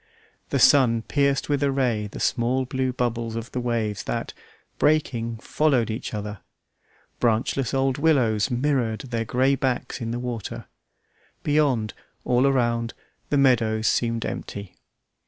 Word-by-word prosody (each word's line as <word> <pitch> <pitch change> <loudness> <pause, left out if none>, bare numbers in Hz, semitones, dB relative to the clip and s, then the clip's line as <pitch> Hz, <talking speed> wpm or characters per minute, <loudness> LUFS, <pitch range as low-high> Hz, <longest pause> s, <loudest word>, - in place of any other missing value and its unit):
The - - 0
sun 120 -5 +5
pierced 140 +1 +1
with 145 -1 0
a 140 -1 +2
ray 120 -6 0
the - - -9
small 125 +2 +1
blue 130 0 -1
bubbles 120 -2 -2
of 115 +1 -5
the 125 - -2
waves 115 -4 -1
that, - - -3 0.5
breaking, 120 -7 +1
followed 130 -1 +1
each 110 - -4
other; 105 -1 -5 0.8
branchless 120 +2 +1
old 135 0 +1
willows 130 -9 +3
mirrored 125 -3 0
their 115 -3 -3
grey 130 +5 +2
backs 130 0 -2
in 115 - -3
the 120 - -2
water; 120 -4 -5 0.8
beyond, 140 -8 +1 0.3
all 125 +2 +3
around, 120 -3 +1 0.3
the 145 - +2
meadows 115 -5 +3
seemed 115 -1 +1
empty. 100 -2 -6
120 Hz, 140 wpm, -24 LUFS, 115-135 Hz, 0.8 s, sun